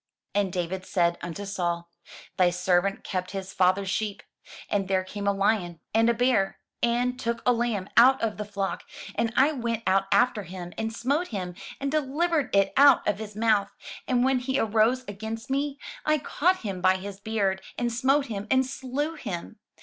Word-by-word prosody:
And 200 -2 +1
David 180 +1 -3
said 170 -2 +1
unto 175 +4 -5
Saul, 175 -3 -2 0.5
"Thy 180 -1 +4
servant 180 +2 +1
kept 185 -1 -3
his 190 0 -6
father's 185 +1 +2
sheep, 210 -1 -2 0.4
and 195 -2 0
there 190 -1 +1
came 200 +2 -5
a - - +5
lion, 195 -4 0
and 225 +1 +4
a - - +4
bear, 230 -5 +2 0.2
and 245 +2 +1
took 235 0 -2
a 250 - +5
lamb 230 -5 -1
out 260 +3 +7
of 220 -2 -1
the 210 - -3
flock: 200 -1 -3 0.3
and 230 -1 0
I 280 +4 +5
went 235 -5 -2
out 195 +1 +3
after 245 -4 +3
him, 175 -1 -8
and 220 0 -2
smote 280 +10 0
him, 185 -5 -4 0.3
and 275 0 -2
delivered 305 0 +1
it 195 0 +3
out 280 -2 +6
of 205 -1 +1
his 210 -1 -7
mouth: 215 -2 +2 0.4
and 250 -1 +2
when 265 -1 +3
he 265 +2 -1
arose 225 +2 +2
against 220 +5 -6
me, 280 +1 -1 0.3
I 305 0 +3
caught 360 +5 +1
him 195 -5 -4
by 185 +1 +4
his 195 +1 -7
beard, 200 -3 -1 0.2
and 240 -1 -1
smote 270 +4 +2
him, 210 -4 -5
and 260 +2 +4
slew 270 +4 -3
him. 180 - -6
215 Hz, 185 wpm, -26 LUFS, 190-250 Hz, 0.5 s, out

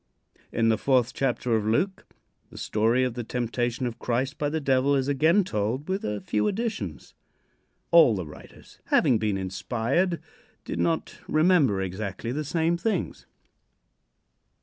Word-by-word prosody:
In 115 0 +2
the 110 0 +2
fourth 130 -3 +2
chapter 125 -3 0
of 110 - +1
Luke 180 - 0 0.4
the - - -13
story 115 +4 +1
of 125 -2 -1
the 120 0 -4
temptation 120 +1 -2
of 120 -2 -4
Christ 130 +4 -2
by 145 - 0
the 160 +2 -1
Devil 140 0 +2
is 135 -1 0
again 155 +8 +3
told 115 - -2
with 190 +2 -2
a 105 0 -2
few 105 0 0
additions. 195 - -4 0.8
All 160 -10 +7
the 90 -3 -4
writers, 75 - -14
having 115 - +3
been 105 -2 0
inspired, 120 - -1 0.5
did - - -4
not 165 -1 -1
remember 155 - +3
exactly 95 +4 -4
the 150 +4 -2
same 165 +3 0
things. 195 -1 -2
125 Hz, 150 wpm, -26 LUFS, 110-155 Hz, 0.8 s, All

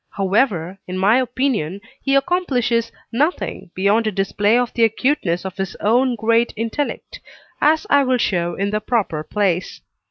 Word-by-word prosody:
However, 195 -3 0
in 185 0 -4
my 200 +5 +4
opinion, 245 - -1 0.2
he 275 0 +1
accomplishes 255 -7 +1 0.2
nothing 290 - -1
beyond 205 +4 +2
a - - +1
display 205 +3 +1
of 245 -1 0
the 235 - +1
acuteness 225 - +1
of 190 0 -6
his 195 -1 -4
own 245 +4 +2
great 230 +2 +2
intellect, 230 +6 -4 0.4
as 315 +5 +3
I 285 - +4
will 255 -1 +2
show 175 -6 0
in 200 +1 -2
the 215 0 -1
proper 210 -9 -1
place. 185 +1 -1
220 Hz, 155 wpm, -20 LUFS, 195-255 Hz, 0.4 s, my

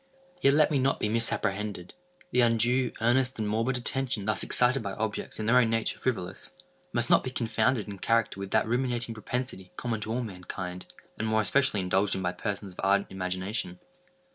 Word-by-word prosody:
Yet 140 +1 +5
let 155 0 +4
me 145 - +2
not 135 +1 +1
be 105 - 0
misapprehended. 105 -4 -1 0.4
The 125 - +3
undue, 120 +2 +3
earnest, 130 +3 +2
and 110 -2 -2
morbid 115 +5 0
attention 125 -3 -1
thus 110 - +1
excited 125 +1 +3
by 100 -3 -4
objects 110 +1 -3
in 110 - -2
their 120 +3 +5
own 115 -2 +3
nature 115 0 -1
frivolous, 115 - -3 0.4
must 120 0 +1
not - - +6
be - - -3
confounded 115 -1 0
in 100 -2 -7
character 115 -3 +1
with 100 0 -5
that - - +2
ruminating 120 0 -1
propensity 110 -3 -5
common 115 -3 -2
to 110 - -4
all 125 +2 -1
mankind, 90 -3 -6 0.3
and 110 - -1
more 110 0 +2
especially 130 -2 +2
indulged 95 +2 +1
in 95 - -3
by 90 - +1
persons 100 0 -4
of - - -20
ardent 100 +1 +2
imagination. 95 - -3
110 Hz, 190 wpm, -28 LUFS, 100-125 Hz, 0.4 s, not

